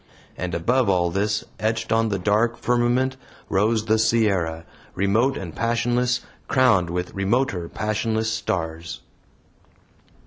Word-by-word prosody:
And 90 -1 -4
above 120 +7 +1
all 90 -2 +2
this, 105 +3 0 0.2
etched 110 0 -1
on 115 0 +2
the 100 - -1
dark 105 +5 +1
firmament, 125 +2 +1 0.3
rose 110 +3 +1
the 110 +1 +2
Sierra, 95 -8 +1 0.3
remote 110 +8 +2
and 85 -5 -7
passionless, 120 +1 +1 0.3
crowned 115 -10 +3
with 90 +1 -3
remoter 95 -3 0
passionless 110 +1 -1
stars. 85 -6 -3
110 Hz, 115 wpm, -23 LUFS, 90-120 Hz, 0.3 s, crowned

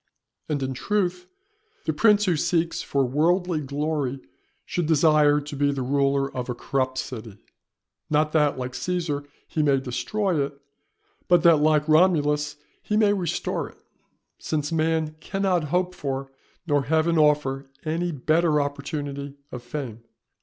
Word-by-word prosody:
And 145 -3 -1
in 130 0 -2
truth 180 +3 -1 0.6
the 160 - 0
prince 210 +4 +4
who 180 -3 +2
seeks 165 +2 0
for 140 -1 0
worldly 165 +5 +1
glory 145 -1 -2 0.5
should 175 -3 -2
desire 150 -2 +4
to 145 0 -7
be 145 0 +2
the 135 -2 -2
ruler 140 +1 +1
of 125 0 -4
a 125 - -2
corrupt 130 0 -1
city; 110 -6 -6 0.7
not 155 0 +2
that, 150 -3 +2
like 125 0 -4
Cæsar, 150 -2 -2 0.2
he 155 - -1
may 140 -2 +3
destroy 165 - -1
it, 140 0 -6 0.7
but 175 -2 +4
that, 170 -2 +7
like 150 0 +3
Romulus, 150 -3 +3 0.3
he 210 - -1
may 210 -2 +4
restore 180 -5 -2
it; - - -20 0.6
since 150 -1 -2
man 160 -1 0
cannot 185 -2 0
hope 180 +4 0
for, 135 -3 -4 0.3
nor 145 -4 +1
Heaven 160 +3 +2
offer 145 -3 +2 0.2
any 170 +3 -1
better 155 +2 +2
opportunity 140 0 -4
of 125 - -6
fame. 120 -3 -6
150 Hz, 145 wpm, -25 LUFS, 140-165 Hz, 0.7 s, that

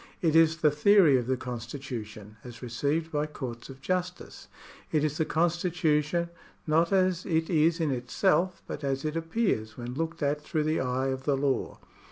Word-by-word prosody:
It 160 -2 +1
is 165 0 +5
the 150 -2 +3
theory 165 0 +5
of 120 - -5
the 130 0 +1
constitu 125 0 -5
tion, 105 0 -13
as 120 -1 -10
received 145 +7 -1
by 150 0 0
courts 125 -6 -7
of 135 0 -11
justice. 180 +3 -4 0.4
It 155 -2 +2
is 155 +2 -1
the 160 - +2
constitution, 170 -1 +1 0.4
not 165 +3 +2
as 185 -2 +2
it 160 -1 0
is 165 +1 +3
in 160 -3 +1
itself, 175 +8 0
but - - -7
as 135 +1 -1
it 155 +1 -2
appears 165 - -1
when 120 0 -6
looked 165 +3 -3
at 145 +1 0
through 155 0 -1
the 155 +1 0
eye 130 +1 -1
of 130 0 -4
the 140 -2 +2
law. 135 -1 -1
150 Hz, 185 wpm, -28 LUFS, 130-165 Hz, 0.4 s, is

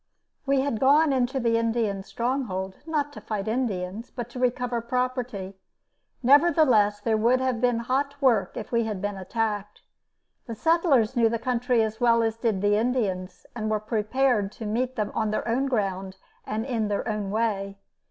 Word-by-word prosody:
We 275 -1 +3
had 270 -5 -1
gone 285 +2 +4
into 260 +1 0
the 230 -2 +2
Indian 225 -4 0
stronghold 205 -5 -3
not 290 -2 -1
to - - -9
fight 210 -2 -4
Indians, 215 -3 -2
but 240 -1 -6
to 250 - -7
recover 250 -1 0
property. 245 -5 -2 0.7
Nevertheless, 260 -7 +4
there 220 +1 0
would 235 +4 +3
have 255 -3 -1
been 245 -2 +2
hot 280 +4 -1
work 245 -7 +2
if 215 - -6
we 235 -1 +2
had 210 -3 -3
been 205 +1 -3
attacked. 210 +1 -3 0.7
The 230 - -5
settlers 285 - +2
knew 230 -2 +4
the 230 - -1
country 245 0 +1
as 220 +2 -4
well 230 -1 +4
as 225 -1 0
did 220 -4 -1
the 205 0 +3
Indians 210 -6 -2
and 215 -2 -2
were 215 -1 +1
prepared 215 0 0
to 225 - -8
meet 245 +4 -1
them 210 -2 -2
on 220 -1 0
their 215 - -2
own 255 +4 +1
ground 195 -6 -2 0.3
and 220 +2 -2
in 230 -5 -1
their 205 +2 -2
own 210 -3 -2
way. 200 -2 -1
230 Hz, 175 wpm, -26 LUFS, 210-255 Hz, 0.7 s, gone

